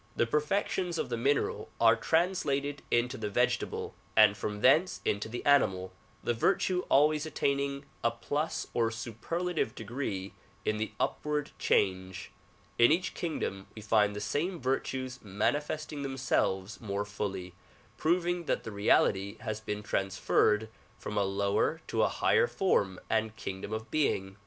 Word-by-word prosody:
The - - +2
perfections 170 +5 0
of - - -2
the 120 - -1
mineral 135 +5 0
are - - +6
translated 145 -5 0
into 125 +2 +1
the 105 -1 -2
vegetable 120 +4 0 0.2
and 105 -2 +7
from 105 +1 -4
thence 160 +9 +4
into 105 +2 0
the 120 - -6
animal, 95 -10 +3 0.3
the 120 - +1
virtue 180 +8 +1
always 150 +2 +4
attaining 140 -1 -1 0.2
a 115 - +4
plus 145 +7 -2
or 115 -1 +2
superlative 120 +7 -3
degree 110 -4 -4 0.3
in 110 - +1
the 110 -1 -2
upward 150 -1 -1
change. 95 -1 0 0.5
In 120 +4 +7
each 175 +4 +1
kingdom 100 - -3
we 110 - -9
find 105 -1 +3
the 105 - -4
same 165 - -1
virtues 130 0 -2
manifesting 145 +9 -2
them 135 -1 -4
selves 95 -6 0
more 100 -2 -2
fully, 100 -3 -4 0.4
proving 175 +1 +1
that - - 0
the 115 - -6
reality 100 -1 +2
has 110 0 -3
been 105 -1 -4
trans 95 -2 -2
ferred 105 +1 +3 0.3
from 105 - -6
a 105 - +2
lower 100 +10 +1
to - - 0
a - - +4
higher 480 - +3
form 100 - +1
and 110 0 0
kingdom 95 -2 -6
of 110 +1 -5
being. 95 -10 0
115 Hz, 150 wpm, -30 LUFS, 105-150 Hz, 0.5 s, and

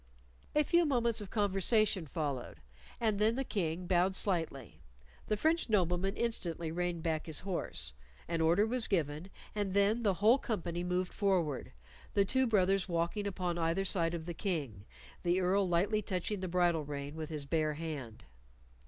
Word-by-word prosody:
A 300 - +5
few 345 +3 +3
moments 235 -7 +1
of 200 - -7
conversation 205 -2 +2
followed, 140 -3 -4 0.4
and 215 -3 +1
then 220 +2 +3
the 270 - 0
King 180 -7 -2
bowed 185 +1 +2
slightly. 140 - -2 0.5
The 215 - 0
French 320 +4 +1
nobleman 185 -1 +1
instantly 170 -8 -2
reined 175 -1 -2
back 160 -2 -1
his 155 -2 0
horse, 185 - -4 0.3
an 165 -1 -1
order 170 +6 +4
was 240 +1 +1
given, 160 -1 -1 0.2
and 205 -2 -2
then 205 +4 +3
the 200 -4 +2
whole 220 +8 +5
company 175 -7 -3
moved 180 0 -1
forward, 180 -9 0 0.4
the 200 -1 +4
two 260 +5 +2
brothers 195 -3 +2
walking 170 +5 -1
upon 180 -3 -2
either 165 +4 +1
side 170 -3 +2
of 160 -1 -6
the 175 - -4
King, 145 - -3 0.4
the 175 +1 +2
Earl 190 +1 +2
lightly 195 +5 +2
touching 190 +1 -2
the 185 - -3
bridle 175 -3 +2
rein 145 0 -5
with 155 -1 -6
his 150 -3 -4
bare 155 0 0
hand. 145 -8 -6
180 Hz, 165 wpm, -33 LUFS, 165-205 Hz, 0.5 s, A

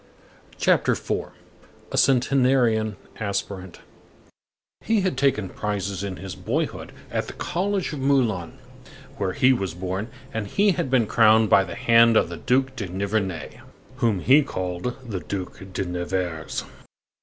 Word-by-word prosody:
CHAPTER - - +3
IV—A - - -7
CENTENARIAN 125 -5 +3 0.2
ASPIRANT 100 -3 -4 1.0
He 220 -2 +2
had 185 -6 0
taken 130 -8 +1
prizes 100 -2 -3
in 100 -2 -4
his 95 -1 -7
boyhood 75 - -3 0.2
at - - -2
the - - -7
College 190 0 -2
of 145 - -5
Moulins, 120 - +1 0.6
where 95 -2 -1
he 130 +4 +4
was 95 -8 -3
born, 95 +5 -3 0.2
and 110 -2 -3
he 200 - +3
had 150 - -2
been 125 -3 +3
crowned 110 -1 +4
by 95 - +6
the 90 - -7
hand 115 -2 +5
of - - +2
the - - -6
Duc 130 +2 +1
de 105 -7 -4
Nivernais, 95 -2 -3 0.4
whom 115 -8 +1
he 140 - +6
called 95 -2 -3
the 100 -5 -3
Duc 95 0 -6
de 95 +1 -2
Nevers. 90 -2 -3
110 Hz, 140 wpm, -24 LUFS, 95-130 Hz, 1.0 s, by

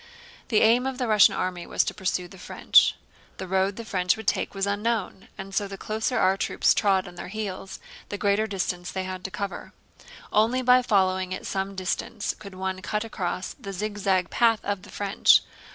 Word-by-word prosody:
The 215 - +3
aim 240 +4 +4
of 265 -1 -4
the 250 -2 -1
Russian 215 -2 +6
army 180 -1 -3
was - - +2
to - - -3
pursue 185 -2 -2
the 190 +1 -14
French. - - +4 0.4
The 190 - -6
road 190 +1 +1
the 230 - -7
French 180 -2 +1
would 220 - -8
take - - 0
was 195 0 0
unknown, 205 -1 -2
and 195 0 -8
so 200 +1 0
the 195 0 -8
closer 220 +5 -2
our 190 +1 +3
troops - - +2
trod 195 -2 +2
on 175 - -10
their 175 - -8
heels 195 -1 -5 0.3
the 205 - -4
greater 205 +2 +1
distance 180 -3 -3
they 190 - -3
had 185 -1 -6
to - - -3
cover. 200 +1 -6 0.6
Only 230 +5 +3
by 250 0 +6
following 190 -4 +1
at - - -9
some 195 0 -3
distance 190 +3 -2
could 200 -2 -10
one 190 0 -3
cut 210 +3 -2
across 185 -4 -4
the 195 - -8
zigzag 195 -2 -1
path 230 -2 +3
of 200 -2 -2
the 200 - -14
French. 200 -1 +4
195 Hz, 200 wpm, -25 LUFS, 185-215 Hz, 0.6 s, Russian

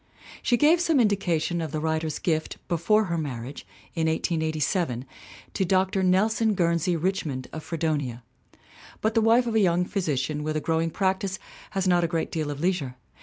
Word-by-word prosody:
She 240 - +2
gave 315 +6 +4
some 325 -5 +3
indica 195 -7 +2
tions 170 +2 -2
of 160 -3 -4
the 155 - -2
writer's 160 -1 -1
gift 160 -2 -1
before 190 +5 +2
her 170 -4 -2
marriage, 135 -3 -6 0.3
in 160 -1 0
1887, 160 - 0 0.5
to - - 0
Dr. 190 +1 +2
Nelson 215 +4 +2
Guernsey 170 0 +1
Richmond 160 -7 -2
of 155 - -6
Fredonia. 150 -8 -2 0.8
But 220 +1 +1
the 225 - +3
wife 230 +3 +4
of 230 - -2
a 220 - +4
young 180 -2 +3
physician 150 -6 -1
with 155 +1 -2
a - - +1
growing 165 +1 0
practice 190 +1 -1 0.4
has 190 -1 +1
not 175 -1 +4
a - - +2
great 165 -1 -2
deal 155 -2 -2
of 145 -1 -5
leisure. 165 -7 -1
170 Hz, 175 wpm, -26 LUFS, 155-190 Hz, 0.8 s, gave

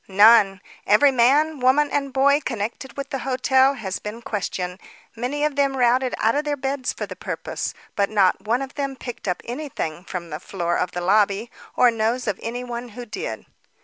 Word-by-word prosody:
"None. 200 -1 +6 0.3
Every 215 +8 +6
man, 280 +5 +3
woman 270 +4 +3
and 275 -1 -1
boy 280 +2 +3
connected 235 +3 -4
with 280 +1 -5
the 270 - -2
hotel 265 +1 +3
has 195 -6 -4
been 220 +3 -7
questioned; 185 -4 -3 0.4
many 265 +6 -1
of 300 -2 -1
them 275 -1 +1
routed 250 +1 +2
out 225 +1 +2
of 290 - 0
their 295 -1 -2
beds 270 -1 -2
for - - -5
the - - -8
purpose, - - -4 0.2
but 200 -1 +1
not 200 -3 +3
one 235 +5 0
of 270 - -8
them 275 -2 -3
picked 245 -4 -8
up 180 - -2
anything 240 - -5
from 175 -3 -6
the 150 - -4
floor 175 -2 -2
of 180 - -1
the 175 - -3
lobby, 205 +4 +2 0.2
or 250 -1 +5
knows 230 +3 -1
of 205 -4 -2
any 240 +2 -4
one 240 0 -6
who 240 +3 -8
did." 385 - -6
245 Hz, 195 wpm, -23 LUFS, 205-270 Hz, 0.4 s, None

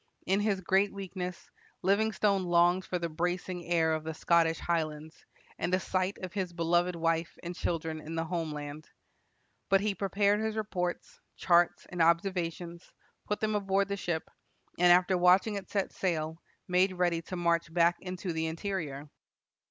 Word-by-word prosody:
In 195 +2 +2
his 205 -2 0
great 190 +3 +2
weakness, 185 -2 -6 0.3
Livingstone 200 0 +2
longed 175 +1 +3
for 180 - -2
the 170 -1 -2
bracing 175 +2 -3
air 165 -2 +2
of 155 -1 -2
the 160 0 -5
Scottish 165 0 +3
highlands, 155 -2 -3 0.3
and 175 - -1
a - - 0
sight 185 +1 -1
of 185 - -5
his 185 -4 -3
beloved 175 +1 +1
wife 165 0 -1
and 175 +1 -4
children 160 -2 -3
in 160 +2 -7
the 165 0 -1
home 165 -2 -2
land. 150 +1 -7 0.8
But 195 0 +4
he 210 0 0
prepared 200 +2 +1
his 220 0 -2
reports, 180 -5 -3 0.2
charts, 175 -1 +3
and 175 - -2
observations, 170 0 0 0.4
put 210 - -2
them 215 0 0
aboard 200 -1 +1
the 200 - -1
ship, 170 -4 -3 0.5
and, 175 0 +6
after 180 +1 +5
watching 185 +4 +5
it 200 -2 -6
set 200 -2 -1
sail, 160 -3 -2 0.3
made 185 +1 +3
ready 175 -2 +1
to 185 - -7
march 170 -2 +1
back 170 +1 +3
into 180 -1 -5
the 160 0 -1
interior. 160 -4 -4
175 Hz, 165 wpm, -30 LUFS, 165-190 Hz, 0.8 s, and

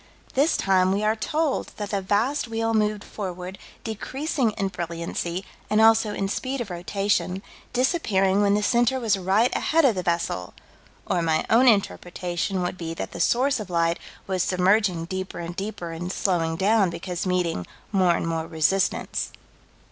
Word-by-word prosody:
This 290 +5 +3
time 185 -1 +3
we 200 +2 0
are 215 +1 +2
told 300 +6 -1
that 205 -1 -4
the 200 -1 0
vast 220 +9 +1
wheel 225 0 -1
moved 210 -1 +1
forward, 185 -2 -6 0.2
decreasing 255 +4 -1
in 195 -2 -1
brilliancy, 170 +1 -4 0.2
and 215 - +3
also 225 -1 +5
in 195 - -1
speed 260 +6 -3
of 225 -6 -4
rotation, 185 +1 -1 0.3
disappearing 205 - +2
when 200 0 +4
the 210 - 0
center 240 +3 +2
was 225 -4 +2
right 195 +6 +2
ahead 325 -1 +3
of 250 - +5
the 185 - -2
vessel 170 - -2 0.5
or 175 - 0
my 160 -1 +1
own 245 +4 +6
interpretation 180 -3 0
would 180 +1 -3
be 165 -1 -4
that - - -5
the - - -8
source 255 +8 +2
of 210 -3 -6
light 170 -1 +1 0.3
was 190 -1 -1
submerging 185 -1 +2
deeper 185 +1 -5
and 170 0 -5
deeper 195 -4 -5
and 175 +2 -4
slowing 165 -5 0
down 200 +2 +3
because 175 +1 -4
meeting 175 - 0 0.2
more 185 -4 +3
and - - -2
more 165 -1 -2
resistance. 170 +4 0
195 Hz, 165 wpm, -25 LUFS, 175-220 Hz, 0.5 s, own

